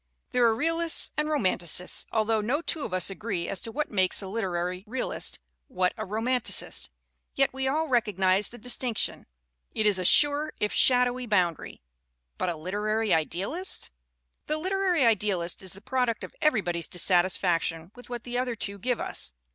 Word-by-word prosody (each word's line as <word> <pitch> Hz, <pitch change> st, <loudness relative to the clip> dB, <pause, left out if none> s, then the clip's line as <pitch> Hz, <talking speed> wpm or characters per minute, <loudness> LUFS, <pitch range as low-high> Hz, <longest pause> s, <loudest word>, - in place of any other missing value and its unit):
There 245 Hz, -1 st, +3 dB
are 225 Hz, -1 st, +4 dB
realists 330 Hz, +5 st, +2 dB
and 300 Hz, 0 st, 0 dB
romanticists 185 Hz, -, +1 dB
although 220 Hz, 0 st, +1 dB
no 270 Hz, +10 st, -1 dB
two 315 Hz, -3 st, -2 dB
of -, -, -6 dB
us 185 Hz, +1 st, +1 dB
agree 195 Hz, -4 st, -3 dB
as 190 Hz, -, -2 dB
to 225 Hz, -, -5 dB
what 300 Hz, +5 st, -3 dB
makes 190 Hz, -3 st, +2 dB
a -, -, -6 dB
lit 220 Hz, +3 st, -3 dB
erary 180 Hz, 0 st, -2 dB
realist, 255 Hz, +3 st, -2 dB, 0.3 s
what 185 Hz, -8 st, 0 dB
a -, -, -5 dB
romanticist. 225 Hz, +4 st, 0 dB, 0.5 s
Yet 275 Hz, -1 st, +2 dB
we 265 Hz, 0 st, -2 dB
all 310 Hz, +4 st, 0 dB
recog 235 Hz, -, +1 dB
nize 190 Hz, +1 st, +3 dB
the 240 Hz, -, -12 dB
distinction. 245 Hz, 0 st, 0 dB, 0.5 s
It 220 Hz, -, +1 dB
is 205 Hz, -3 st, +4 dB
a -, -, -1 dB
sure 290 Hz, -, +4 dB
if 210 Hz, -, 0 dB
shadowy 250 Hz, -1 st, +3 dB
bound 180 Hz, -6 st, +2 dB
ary. -, -, -11 dB, 0.6 s
But -, -, 0 dB
a 170 Hz, -, -2 dB
literary 210 Hz, +5 st, 0 dB
idealist? 190 Hz, -, -2 dB, 0.6 s
The 305 Hz, -, 0 dB
literary 370 Hz, -3 st, +1 dB
idealist 200 Hz, -6 st, +1 dB
is 190 Hz, -2 st, -4 dB
the 195 Hz, -, -13 dB
product 250 Hz, -1 st, -1 dB
of -, -, -8 dB
everybody's 180 Hz, -, +1 dB
dissatisfaction 175 Hz, -2 st, +1 dB
with 245 Hz, 0 st, -13 dB
what 240 Hz, -1 st, -5 dB
the 245 Hz, 0 st, -2 dB
other 250 Hz, -2 st, -1 dB
two 200 Hz, -2 st, -4 dB
give 250 Hz, +4 st, -1 dB
us. -, -, -5 dB
220 Hz, 175 wpm, -27 LUFS, 185-255 Hz, 0.6 s, are